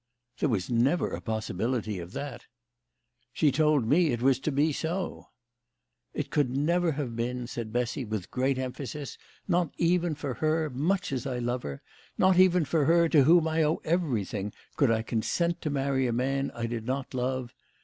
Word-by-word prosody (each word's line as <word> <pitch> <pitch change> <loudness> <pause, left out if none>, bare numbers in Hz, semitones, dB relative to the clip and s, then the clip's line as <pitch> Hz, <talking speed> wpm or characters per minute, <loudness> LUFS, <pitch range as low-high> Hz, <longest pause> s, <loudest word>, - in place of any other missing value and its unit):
" 125 0 -34
There 150 - +2
was 100 -7 0
never 125 +8 +2
a - - -4
possibility 110 -1 -2
of 85 +1 -8
that." 140 -2 -6 0.4
" 125 +1 -48
She 150 -3 +3
told 150 -2 +3
me 160 +8 +4
it 120 -5 0
was 130 +1 +3
to 155 - -2
be 145 +3 +2
so." 170 +5 -3 0.4
" - - -54
It - - -4
never 165 +6 +1
could - - -8
have 125 -5 -3
been," 120 +1 -2
said 120 -2 -5
Bessy 125 +4 -1
with 105 -5 -5
great 130 +1 +1
emphasis. 130 +2 -5
" - - -32
Not 175 -4 +1
even 175 -1 +2
for 145 -3 -4
her, 155 +2 0
much 170 +9 0
as 130 0 -2
I 130 -2 -2
love 120 +1 -1
her 70 -1 -7 0.3
not 185 -1 +4
even 180 -3 +5
for 155 -1 +1
her 170 +2 +4
to 145 -5 +5
whom 165 +1 +5
I 160 0 +1
owe 155 +1 +2
everything 115 - -1 0.2
could 140 - +3
I 110 -1 +1
consent 170 +10 -1
to 155 - -2
marry 135 -2 0
a 120 - -1
man 135 +3 0
I 115 - -2
did 115 -1 -4
not 130 +1 -3
love. 130 -1 -2
135 Hz, 195 wpm, -28 LUFS, 120-155 Hz, 0.4 s, even